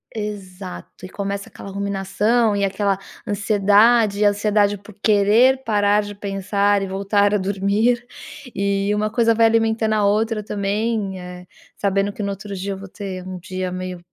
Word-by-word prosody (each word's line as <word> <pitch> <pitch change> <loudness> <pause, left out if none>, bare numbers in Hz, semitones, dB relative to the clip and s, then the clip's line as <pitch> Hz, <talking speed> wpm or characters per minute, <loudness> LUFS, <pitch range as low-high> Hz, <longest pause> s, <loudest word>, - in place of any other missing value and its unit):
Exato 195 -3 -7
e - - -9
começa 200 0 -4
aquela 195 - -10
ruminação, 200 +3 0
e 200 - 0
aquela 195 0 0 0.3
ansiedade 205 +1 +3
e - - +4
ansiedade 205 0 +2
por 205 +1 -15
querer 225 +6 +4
parar 205 -1 +3
de 205 0 -7
pensar, 200 0 0
e 195 - -2
voltar 200 +2 +1
a - - +4
dormir. 205 +5 0 0.5
E 200 +1 0
uma 215 +1 0
coisa 230 -1 +3
vai 230 0 +4
alimentando 225 -1 +2
a 210 -1 +2
outra 215 +1 +1
também, 205 -1 -2
eh, 180 0 -9 0.3
sabendo 200 0 0
que 210 - -5
no 200 - -1
outro 200 0 -6
dia 195 +2 -4
eu - - -7
vou 195 0 -9
ter 185 -2 -7
um 185 -1 -6
dia 185 +1 -4
meio 185 -1 -5
200 Hz, 165 wpm, -21 LUFS, 195-215 Hz, 0.5 s, e